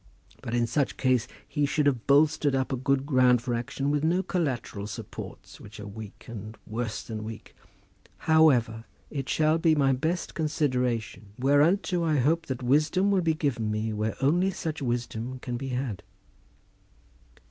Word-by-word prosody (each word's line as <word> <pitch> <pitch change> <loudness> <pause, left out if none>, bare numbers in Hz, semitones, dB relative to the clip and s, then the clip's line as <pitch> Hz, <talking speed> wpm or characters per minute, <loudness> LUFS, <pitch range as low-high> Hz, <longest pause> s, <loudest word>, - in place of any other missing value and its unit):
But 115 - -3
in 120 -1 +2
such 130 +4 -1
case 130 -3 +2 0.2
he 145 -2 0
should 150 +1 +1
have 130 -5 +1
bolstered 145 0 +4
up 130 0 -1
a - - +2
good 135 +1 0
ground 130 -3 +4
for 120 +1 -3
action 130 +4 -2
with 145 0 0
no 175 +4 +2
collateral 130 - -2
supports 105 - -9
which 105 +1 -11
are 105 - -7
weak, 105 0 -10
and 110 -1 -8
worse 110 0 -4
than 110 -2 -6
weak. 110 0 -9 0.7
However, 125 -9 +4 0.3
it 135 -3 -4
shall 155 +1 +2
have 160 -2 +4
my 135 -2 +4
best 160 +7 -2
consideration, 125 -9 -1
whereunto 165 +7 +3
I 155 -2 +2
hope 165 +6 +1
that 130 -1 -4
wisdom 155 +9 +3
will 195 -2 +3
be 165 -2 +1
given 125 -8 -1
me 110 +1 -1
where 110 +1 -2
only 175 +7 +3
such 160 -5 -4
wisdom 120 0 -3
can 125 -1 -5
be 135 +3 -4
had." 125 -5 -3
130 Hz, 165 wpm, -27 LUFS, 115-155 Hz, 0.7 s, bolstered